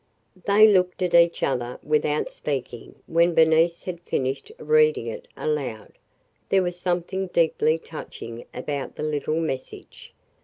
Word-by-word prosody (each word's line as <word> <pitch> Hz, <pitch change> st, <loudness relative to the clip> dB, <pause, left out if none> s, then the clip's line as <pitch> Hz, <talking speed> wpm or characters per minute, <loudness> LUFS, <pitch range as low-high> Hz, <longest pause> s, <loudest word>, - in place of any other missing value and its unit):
They 210 Hz, +2 st, +7 dB
looked 185 Hz, -2 st, +2 dB
at 180 Hz, -, -1 dB
each 170 Hz, 0 st, +4 dB
other 125 Hz, -2 st, -1 dB
without 150 Hz, 0 st, 0 dB
speaking 130 Hz, -5 st, -5 dB
when 170 Hz, +1 st, +2 dB
Bernice 160 Hz, +1 st, +4 dB
had 175 Hz, -2 st, -6 dB
finished 135 Hz, -, -3 dB
reading 460 Hz, -2 st, +3 dB
it -, -, -6 dB
aloud. 460 Hz, -1 st, -3 dB, 0.6 s
There 190 Hz, -1 st, +3 dB
was 175 Hz, 0 st, -4 dB
something 180 Hz, +2 st, -2 dB
deeply 160 Hz, -2 st, +2 dB
touching 120 Hz, -7 st, -9 dB
about 140 Hz, +2 st, -5 dB
the -, -, -5 dB
little 155 Hz, +1 st, -1 dB
message. 145 Hz, -5 st, -6 dB
170 Hz, 130 wpm, -24 LUFS, 150-185 Hz, 0.6 s, They